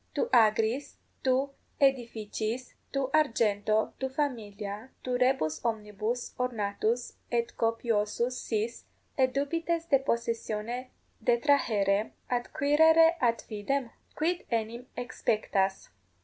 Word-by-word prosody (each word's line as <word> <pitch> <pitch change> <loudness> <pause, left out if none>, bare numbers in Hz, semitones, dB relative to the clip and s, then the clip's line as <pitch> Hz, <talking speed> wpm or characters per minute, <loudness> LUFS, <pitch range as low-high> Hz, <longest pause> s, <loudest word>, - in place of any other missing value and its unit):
Tu - - +1
agris, 225 +4 +3 0.3
tu 265 +2 +2 0.3
aedificiis, 235 -3 0 0.2
tu 270 -1 -1
argento, 220 -7 +2
tu 265 - -1
familia, 220 -5 -3
tu 250 -1 -1
rebus 245 - +1
omnibus 220 +1 -2
ornatus 230 0 -1
et 235 -1 0
copiosus 230 +1 0
sis, 230 -1 -3 0.3
et 260 -1 +3
dubites 330 +4 -1
de 275 - +6
possessione 235 0 -2 0.3
detrahere, 225 -5 +2 0.2
adquirere 315 +6 +4
ad 235 -2 +2
fidem? 235 +4 -2 0.2
Quid 345 +3 0
enim 235 +2 -2
exspectas? 210 -5 -1
235 Hz, 95 wpm, -29 LUFS, 215-270 Hz, 0.3 s, de